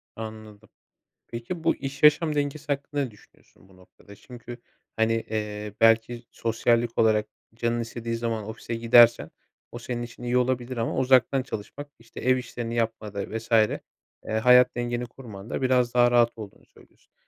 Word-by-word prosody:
Anladım. 110 -1 -10 0.6
Peki 120 +9 -6
bu - - +2
iş 135 +1 -7
yaşam 150 +1 +5
dengesi 145 +1 -2
hakkında 145 0 -2
ne 130 - -5
düşünüyorsun 100 -1 -23
bu 95 - -20
noktada? 95 +2 -17
Çünkü 120 +1 -11 0.4
hani, 110 0 +2
eee, 105 -2 -4
belki 115 +1 +3
sosyallik 115 +1 0
olarak 110 -1 +3 0.3
canının 120 0 -1
istediği 115 0 -5
zaman 115 -2 -3
ofise 115 +1 -6
gidersen 115 0 +5 0.4
o 120 - -7
senin 120 0 -5
için 120 +1 -10
iyi 120 +1 +1
olabilir 125 0 -1
ama 115 - -2
uzaktan 130 0 +3
çalışmak 135 +4 -7
işte 115 0 -12
ev 130 +1 +2
işlerini 120 -1 -5
yapmada 110 -2 -3
vs. 115 +2 -11
eee, 110 -2 +3 0.6
hayat 125 +1 +6
dengeni 120 0 -2
kurmanda 115 -4 -8
biraz 125 -2 +2
daha 120 0 +4
rahat 120 -1 +4
olduğunu 105 -3 -11
söylüyorsun. - - -24
120 Hz, 155 wpm, -25 LUFS, 110-125 Hz, 0.6 s, hayat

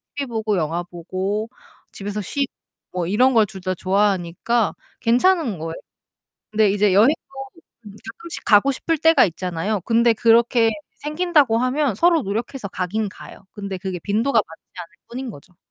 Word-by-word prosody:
TV 280 -2 -3
보고 220 -3 -1
영화 165 +2 -1
보고 190 +5 -4 0.4
집에서 205 +1 -4
쉬고 275 +8 -3 0.4
뭐 180 -2 -2
이런 250 +7 +3
걸 220 -2 +5
둘 190 -2 -9
다 185 0 -1
좋아하니까 195 +3 0 0.3
괜찮은 250 - +2
거예요. 165 0 -5 0.8
근데 215 -1 +3
이제 205 -1 +2
여행도 225 +10 +6 0.7
음 205 0 -11
가끔씩 335 +9 -8
가고 225 +5 +5
싶을 325 +4 -1
때가 325 +2 +5
있잖아요. 180 +3 -2
근데 235 0 +4
그렇게 230 0 +4 0.3
생긴다고 300 -6 +2
하면 255 -1 0
서로 335 - +3
노력해서 220 +3 -4
가긴 200 +4 -2
가요. 190 - -13
근데 200 -2 -5
그게 185 -1 -5
빈도가 225 +6 +1
많지 160 - -15 0.2
않을 170 0 -8 0.2
뿐인 250 0 -5
거죠. 175 +2 -16
215 Hz, 330 characters per minute, -21 LUFS, 190-250 Hz, 0.8 s, 여행도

